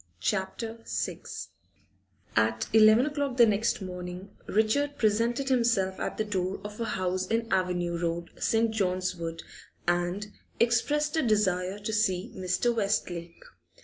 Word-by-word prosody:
CHAPTER 215 - -2
VI - - -2 1.2
At - - +2
eleven 220 +3 +7
o'clock 285 -3 -2
the 240 - +8
next 215 0 +1
morning 180 +1 -7
Richard 280 +8 +1
presented 235 +4 +1
himself 230 -7 +2
at - - -3
the 215 - +1
door 190 -2 -2
of 210 +1 -8
a - - 0
house 185 -2 -1
in 230 +2 0
Avenue 180 -2 0
Road, 170 0 -2
St. 225 0 +2
John's 185 -3 0
Wood, 165 -1 -5 0.4
and 175 +3 0 0.3
expressed 295 +6 +2
a - - +4
desire 195 -5 +1
to 210 +1 -4
see 205 0 0
Mr. 185 +6 0
Westlake. 175 -5 -2
205 Hz, 135 wpm, -28 LUFS, 180-230 Hz, 1.2 s, the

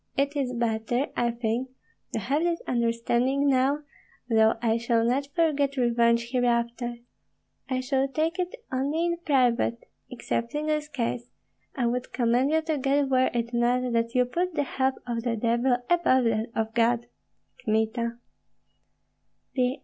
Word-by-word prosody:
It 280 +1 +1
is 270 -3 -1
better, 235 +3 -1
I 240 - +1
think, 235 +2 -2 0.4
to - - 0
have 275 +9 0
this 340 0 0
understanding 240 +3 +1
now; 275 +2 +2 0.4
though 220 -2 +4
I 225 -1 +1
shall 230 -1 +1
not 265 +4 +1
forget 285 -4 +1
revenge 235 -1 +2
hereafter, 240 -1 0 0.7
I 255 -1 0
shall 265 +1 +1
take 320 +6 -1
it 360 +5 -2 0.2
only 285 +6 0
in 340 0 0
private, 245 -4 +1 0.2
excepting 250 +4 -3
this 305 -1 0
case. 245 -4 -3 0.5
I 250 - 0
would 250 +2 -2
commend 245 +2 +2
you 320 +1 +2
to 315 -2 -1
God 275 +1 +1
were 260 0 +4
it 235 0 -2
not 245 +1 +1
that 230 +1 0
you 250 0 +4
put 345 +7 -2
the 290 - +1
help 265 -1 0
of 235 -2 -2
the 235 -1 -1
devil 235 +3 +1
above 335 -7 +3
that 225 -1 +1
of 225 0 -1
God. 235 +1 +2 0.6
Kmita. 230 +1 0
250 Hz, 150 wpm, -26 LUFS, 235-275 Hz, 0.7 s, though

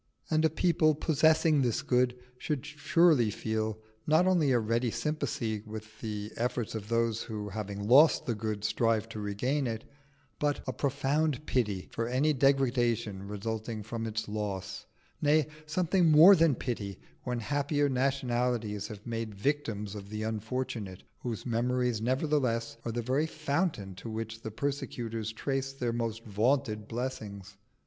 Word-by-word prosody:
And 155 0 +3
a 160 - +5
people 155 -1 +3
possessing 155 0 +3
this 120 -4 0
good 125 0 +2 0.2
should 150 -2 -2
surely 150 -3 +3
feel 110 +1 -2 0.3
not 160 +4 +5
only 175 -6 +3
a 125 - +4
ready 115 +2 +1
sympathy 115 -3 -2
with 110 0 -9
the 105 -1 -4
effort 120 -1 -1
of 110 -2 -5
those 115 -1 +1
who, 105 -2 -5
having 100 0 -4
lost 150 +6 +6
the 120 - 0
good, 105 -1 -3
strive 110 0 +1
to 110 - -6
regain 125 +7 -1
it, 110 -1 -3 0.6
but 145 -1 0
a 130 - -2
profound 145 +1 0
pity 105 -7 0
for 115 - -2
any 135 +5 +2
degradation 120 -7 +1
resulting 110 +1 -4
from 115 +1 -4
its 110 0 -3
loss; 100 -2 -4 0.3
nay, 150 0 +4 0.2
something 175 +2 +2
more 160 +6 +9
than 165 -5 +4
pity 105 -6 -4 0.3
when 125 -2 -2
happier 145 +4 +1
nationalities 125 -5 0
have 105 -3 -10
made 115 -3 -4
victims 105 -4 -1
of 100 -2 -8
the 110 0 -4
unfortunate 110 -3 -3 0.2
whose 115 -4 -4
memories 125 -1 0
nevertheless 130 -2 0
are 115 - -1
the 120 +1 -2
very 135 +6 +1
fountain 155 - -1
to 95 +5 -8
which 115 0 -5
the 110 - -5
persecutors 115 -2 -3
trace 135 +3 -2
their 125 -3 -2
most 115 -1 -3
vaunted 110 0 0
blessings. 105 -5 -5
120 Hz, 150 wpm, -30 LUFS, 110-140 Hz, 0.6 s, more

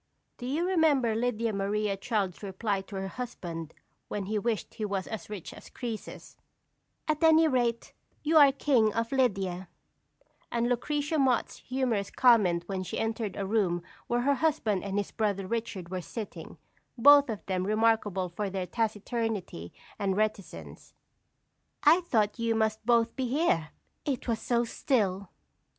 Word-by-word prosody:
Do 245 - -5
you 305 +7 0
remember 300 -10 +3
Lydia 230 -1 0
Maria 200 +1 0
Child's 195 -3 -2
reply 200 0 -2
to 200 - -9
her 190 0 -3
husband 175 -9 -6 0.3
when 205 -2 -3
he 210 +2 -1
wished 225 +1 -2
he 220 - -5
was 195 -2 -2
as 220 -4 -7
rich 205 -5 -7
as - - -13
Croesus: 230 -4 -7 0.7
"At 310 +1 0
any 320 0 +6
rate, 240 -4 0 0.3
you 315 +1 +3
are 285 -2 +8
King 255 -6 +2
of 230 0 -1
Lydia;" 195 -9 0 0.8
and 235 0 +1
Lucretia 290 +5 0
Mott's 260 -4 +1
humorous 250 -6 -1
comment 205 -9 +4
when 190 0 -3
she 185 - -5
entered 225 -3 -2
a 200 - -3
room 190 -5 +1 0.2
where 240 0 +1
her 280 +3 +3
husband 260 - 0
and 200 0 -3
his 205 - -2
brother 200 -3 -1
Richard 205 -4 -4
were 185 0 -3
sitting, 215 +4 -8 0.4
both 285 +2 +7
of 215 -3 -5
them 185 -1 -1
remarkable 215 -3 +2
for 195 +4 -4
their 190 -1 -3
taciturnity 215 - -3 0.3
and 195 -2 0
reticence: 215 -2 -4 0.9
"I 350 - +6
thought 220 - 0
you 230 -1 +1
must 220 -1 0
both 230 -1 +3
be 260 -2 -1
here 240 - +1 0.3
it 270 -4 -3
was 230 -2 0
so 235 +1 +1
still!" 200 -6 0
220 Hz, 155 wpm, -29 LUFS, 195-245 Hz, 0.9 s, are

